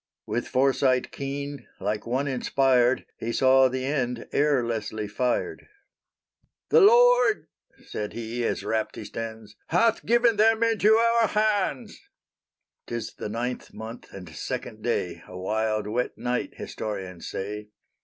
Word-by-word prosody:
With 120 - -2
foresight 130 -1 +2
keen, 140 +1 -5
like 105 +3 -2
one 130 +4 0
inspired, 130 -1 +2
He 115 - -3
saw 130 +2 +5
the 130 0 -3
end 125 -4 -2
ere 140 -4 +2
Leslie 110 -2 -3
fired. 125 - -2 1.0
"THE 470 - +6
LORD," 475 0 +5 0.4
said 105 -1 -5
he, 120 +1 -4
as 105 - -1
rapt 110 +1 -1
he - - -7
stands, 110 -2 -7
"HATH 225 +7 +2
GIVEN 235 -1 +3
THEM 225 +1 +4
INTO 220 -1 +4
OUR 230 0 +3
HANDS!" 205 - 0 0.9
'Tis 115 -2 -4
the - - -6
ninth 120 +3 -4
month 115 +2 -9
and 95 -2 -9
second 80 - -5
day, - - -2
A 90 - -9
wild, 110 +2 -1
wet 115 +4 -2
night, 125 0 -2
historians 95 -5 -6
say. 105 +2 -5
125 Hz, 135 wpm, -26 LUFS, 110-150 Hz, 1.0 s, THE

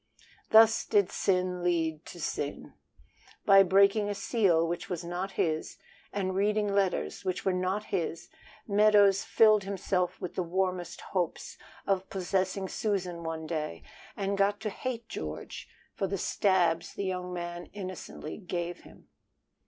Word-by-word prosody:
Thus 225 0 +7
did 200 -3 +2
sin 180 -2 0
lead 165 -3 0
to 175 - -10
sin. 145 -2 -4 0.7
By 195 -1 +8
breaking 200 +2 +4
a 205 - -2
seal 195 -6 +2
which 170 +1 -4
was 180 -2 -3
not 180 +3 -4
his 155 -1 -1 0.3
and 190 -2 -2
reading 205 +1 +1
letters 185 - 0
which 185 -1 -3
were 190 - +2
not 185 +3 -1
his, 170 -4 -3 0.4
Meadows 205 -2 +5
filled 215 -2 +5
himself 185 -2 -1
with 180 -3 -5
the - - -1
warmest 180 0 -2
hopes 180 -4 -3 0.3
of 190 -1 0
possessing 190 0 -1
Susan 185 -5 -2
one 160 -1 -4
day, 155 - -4 0.3
and 200 0 -1
got 200 +1 +2
to 215 - -2
hate 235 0 -5
George 75 - -6 0.3
for 195 - -2
the 195 +1 -2
stabs 175 -4 +1
the 200 - -3
young 180 -1 -3
man 175 0 -5
innocently 185 -5 -7
gave 175 -2 -4
him. - - -17
185 Hz, 145 wpm, -29 LUFS, 175-200 Hz, 0.7 s, By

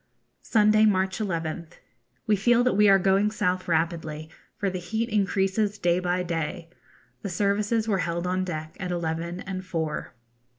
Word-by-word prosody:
Sunday, 215 -1 +4
March 190 -1 +1
11th. 170 -4 -3 0.5
We 215 - +3
feel 240 +4 +3
that 250 - +2
we 210 0 +5
are 195 - +7
going 195 +2 +3
south 185 -3 -1
rapidly, 160 -2 -1 0.3
for 200 - -1
the 185 -1 -2
heat 220 +6 -2
increases 200 0 +1
day 175 -2 +2
by 180 0 0
day. 165 0 -4 0.5
The 200 - -4
services 205 +4 0
were 200 -4 +1
held 170 0 -2
on 185 +1 0
deck 155 -3 -5
at 180 - -4
eleven 170 0 -3
and 185 -1 -5
four. 160 -7 -4
185 Hz, 160 wpm, -26 LUFS, 170-205 Hz, 0.5 s, are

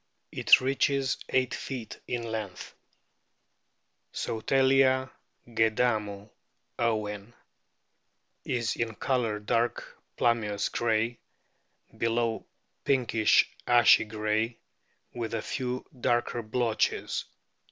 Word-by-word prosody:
It - - +6
reaches 135 0 +1
eight 130 -1 +1
feet 125 -5 -6
in 120 -1 -2
length. 110 -5 -5 1.4
Solatia 130 +2 +2 0.4
gadamu, 110 -3 0 0.5
Owen,* 110 -1 -2 1.1
is 120 -2 -1
in 115 -1 -2
colour 120 -5 0
dark 115 +3 -2 0.2
plum 120 -1 +3
beous 105 -1 -2
grey, 115 +1 0 0.8
below 115 0 -1 0.4
pinkish 120 -5 +3 0.2
ashy 120 -2 +6
grey, 110 +2 -1 0.6
with 115 -1 -4
a 110 - -3
few 125 -1 -3
darker 120 0 0
blotches. 115 0 -1
115 Hz, 85 wpm, -28 LUFS, 110-125 Hz, 1.4 s, It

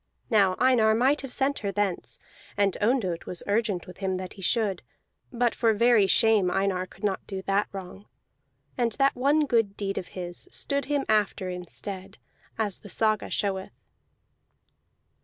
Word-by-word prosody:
Now 195 -4 +4
Einar 235 -4 +4
might 265 +6 +3
have 270 -2 -7
sent 275 +2 0
her 200 -2 -2
thence, 200 -3 -1 0.4
and 200 -2 +2
Ondott 205 -7 0
was 180 - -5
urgent 205 -3 0
with 180 0 -12
him 190 -1 -1
that 185 0 -6
he 195 - -12
should; 200 -1 +1 0.5
but 240 -1 +1
for 225 -2 +2
very 235 -2 +5
shame 215 -3 +4
Einar 185 0 0
could - - -18
not 200 -2 -1
do 190 -2 -5
that 195 +2 +1
wrong, 195 +1 -9 0.7
and 235 -2 0
that 275 +2 +2
one 285 +4 +3
good 225 -6 +1
deed 195 -1 -2
of 180 - -8
his 175 -1 -6
stood 280 0 -2
him 290 -1 0
after 205 -3 +1
in 180 -1 -6
stead, 195 +2 -7 0.4
as 210 -4 -1
the 205 - -12
saga 215 +1 +1
showeth. 195 -2 -2
205 Hz, 165 wpm, -27 LUFS, 190-235 Hz, 0.7 s, very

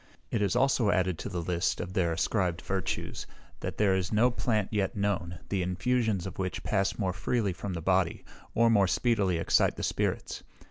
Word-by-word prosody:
It 110 - 0
is 100 +2 +1
also 125 -4 +3
added 90 -4 +1
to - - -4
the 85 -1 -3
list 85 0 0
of 90 - -5
their 85 -3 +1
ascribed 85 +1 0
virtues, 95 -3 -3 0.3
that - - -5
there 100 -3 +3
is 95 -1 -1
no 115 +4 +4
plant 110 -4 0
yet 100 -3 0
known, 100 -4 -1
the 100 -2 0
infusions 100 +2 0
of 95 -1 -7
which 95 -1 -3
pass 100 -2 0
more 95 -4 0
freely 100 +2 0
from 95 +2 -5
the 85 -2 -5
body, 95 -1 +1 0.3
or 115 +1 +5
more 100 -3 +4
speedily 100 -4 +1
excite 80 - +2
the - - -5
spirits. - - -1
95 Hz, 190 wpm, -29 LUFS, 90-105 Hz, 0.3 s, or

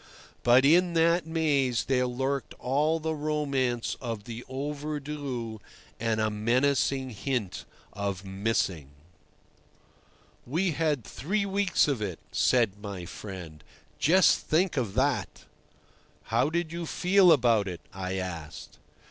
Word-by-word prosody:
But 125 +2 +5
in 170 +3 +4
that 165 0 +3
maze 145 -7 +1
there 125 -1 +1
lurked 135 +2 -2
all 150 +5 +1
the 160 0 -2
romance 140 -5 -1
of 115 -5 -4
the 115 +2 -7
"overdue" 140 -4 -4 0.4
and 115 -1 0
a 110 0 +1
menacing 130 +4 +1
hint 110 -3 -3 0.3
of 100 -2 -3
"missing." 95 -6 -1 1.6
"We 170 +8 0
had 150 -4 0
three 200 - -2
weeks 200 -3 +2
of 135 -6 -1
it," 95 -5 -3
said 115 -6 +2
my 100 -4 -6
friend, 90 -5 -9 0.4
"just 185 +5 +5
think 175 +3 +1
of 115 -7 -2
that!" 130 +1 0 0.8
"How 145 - +1
did 170 0 -2
you 170 -1 -4
feel 185 +1 +4
about 120 -8 +4
it?" 90 -2 -6
I 95 0 -4
asked. 85 -5 -7
130 Hz, 125 wpm, -28 LUFS, 110-155 Hz, 1.6 s, But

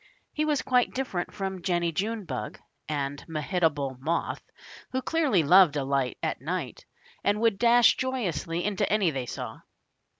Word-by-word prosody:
He 305 - 0
was 300 -3 +1
quite 250 -1 +2
different 255 -9 -2
from 190 -2 -4
Jennie 175 -2 0
Junebug 185 - -3 0.3
and 140 -1 -3
Mehitable 155 -4 -1
Moth, 160 +5 -2 0.5
who 260 - +1
dearly 290 - +2
loved 175 +1 +6
a 145 - 0
light 135 -2 0
at - - -2
night, - - -4 0.4
and 205 +1 +2
would 225 -3 +2
dash 240 0 +6
joyously 180 - -2
into 200 -3 0
any 200 -5 +3
they 130 -3 -4
saw. - - -6
180 Hz, 145 wpm, -27 LUFS, 150-225 Hz, 0.5 s, loved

